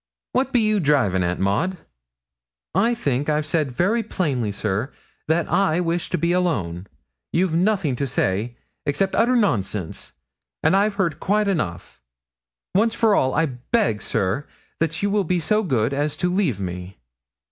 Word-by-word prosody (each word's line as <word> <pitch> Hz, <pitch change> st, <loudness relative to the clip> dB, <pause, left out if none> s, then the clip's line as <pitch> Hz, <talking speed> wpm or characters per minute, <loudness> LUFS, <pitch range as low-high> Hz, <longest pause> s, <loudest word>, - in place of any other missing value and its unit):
What 265 Hz, +1 st, 0 dB
be 245 Hz, -, +3 dB
you 215 Hz, -1 st, +2 dB
drivin' 135 Hz, -, +2 dB
at, 90 Hz, 0 st, -1 dB
Maud?' 160 Hz, -, 0 dB, 1.0 s
'I 235 Hz, +3 st, +2 dB
think 140 Hz, -, -1 dB
I've 150 Hz, 0 st, +1 dB
said 150 Hz, -3 st, 0 dB
very 200 Hz, -, +2 dB
plainly, 140 Hz, -, -1 dB
sir, 105 Hz, +5 st, -2 dB, 0.4 s
that 160 Hz, +2 st, +1 dB
I 185 Hz, -4 st, +2 dB
wish 170 Hz, -1 st, -1 dB
to -, -, 0 dB
be 170 Hz, +2 st, +1 dB
alone. 105 Hz, -, -1 dB, 0.4 s
You've 175 Hz, -1 st, +1 dB
nothing 180 Hz, -5 st, +1 dB
to 140 Hz, -, -1 dB
say, 115 Hz, -1 st, -1 dB, 0.3 s
except 190 Hz, +7 st, +1 dB
utter 240 Hz, +3 st, +3 dB
nonsense, 105 Hz, -, -1 dB, 0.5 s
and 160 Hz, +5 st, +4 dB
I've 200 Hz, +1 st, +2 dB
heard 170 Hz, -6 st, 0 dB
quite 210 Hz, +1 st, +1 dB
enough. 85 Hz, -, -3 dB, 0.7 s
Once 220 Hz, +4 st, +2 dB
for 225 Hz, -2 st, +3 dB
all, 130 Hz, -8 st, +2 dB
I 165 Hz, +2 st, +3 dB
beg, 130 Hz, -, -1 dB
sir, 100 Hz, +10 st, -1 dB, 0.3 s
that 165 Hz, +2 st, -1 dB
you 200 Hz, -, +1 dB
will 205 Hz, -1 st, +2 dB
be 180 Hz, 0 st, 0 dB
so 210 Hz, +7 st, +1 dB
good 130 Hz, -, 0 dB
as 145 Hz, +1 st, -1 dB
to 180 Hz, 0 st, 0 dB
leave 175 Hz, -, +1 dB
me.' 90 Hz, 0 st, -6 dB
160 Hz, 160 wpm, -22 LUFS, 120-195 Hz, 1.0 s, and